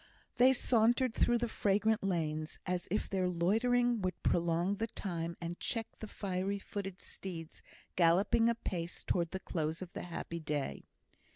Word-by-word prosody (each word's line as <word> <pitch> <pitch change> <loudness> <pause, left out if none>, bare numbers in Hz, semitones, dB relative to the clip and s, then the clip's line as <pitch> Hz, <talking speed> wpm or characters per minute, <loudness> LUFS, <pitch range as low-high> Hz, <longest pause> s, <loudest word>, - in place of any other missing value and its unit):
They 255 +2 +7
sauntered 240 0 +3
through 240 +1 +3
the 240 0 0
fragrant 210 0 +2
lanes, 155 -4 -1
as 180 -1 -2
if 210 - 0
their 185 -2 0
loitering 230 +7 +2
would 185 0 -3
prolong 170 +3 +2
the 225 - -1
time, 170 -6 -4
and 170 0 -5
check 225 -2 -1
the 220 - -6
fiery 195 0 -2
footed 195 -1 -6
steeds 165 -4 -7 0.3
galloping 185 +7 +4
apace 180 -7 -3
towards 170 -2 0
the 190 - -4
close 160 -3 -2
of 185 -2 -7
the - - -4
happy 170 -1 -5
day. 150 -3 -3
185 Hz, 155 wpm, -34 LUFS, 170-220 Hz, 0.3 s, They